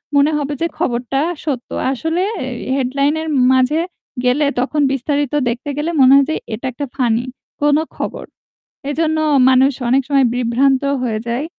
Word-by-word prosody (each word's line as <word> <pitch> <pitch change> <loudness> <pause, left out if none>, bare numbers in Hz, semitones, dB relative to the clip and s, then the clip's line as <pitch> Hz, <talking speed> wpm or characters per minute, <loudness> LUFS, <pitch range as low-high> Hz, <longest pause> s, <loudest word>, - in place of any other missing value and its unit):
মনে 285 +2 +4
হবে 290 0 -2
যে 335 - +2
খবরটা 255 -3 -1 0.2
সত্য। 265 -6 -3 0.2
আসলে 320 +6 -1 0.3
এর 250 -2 -5 0.2
হেডলাইন 275 +2 +1
এর 320 - -5 0.3
মাঝে 260 +5 +2 0.4
গেলে 255 +4 +2
তখন 290 +4 0
বিস্তারিত 285 +1 -1 0.2
দেখতে 245 +5 -4
গেলে 300 +3 -1
মনে 260 0 +7
হয় 280 0 +5
যে - - -1 0.2
এটা 220 +4 -6
একটা 285 +4 -5
ফানি 245 -2 +1 0.4
কোন 290 0 +4 0.2
খবর। - - -5 0.6
এজন্য 315 +1 0 0.3
মানুষ 265 +1 +4 0.2
অনেক 265 +3 +4
সময় 275 -2 +4
বিভ্রান্ত 250 +2 +2 0.2
হয়ে 220 -3 -1
যায়। 245 +6 -2
275 Hz, 155 wpm, -17 LUFS, 250-295 Hz, 0.6 s, মনে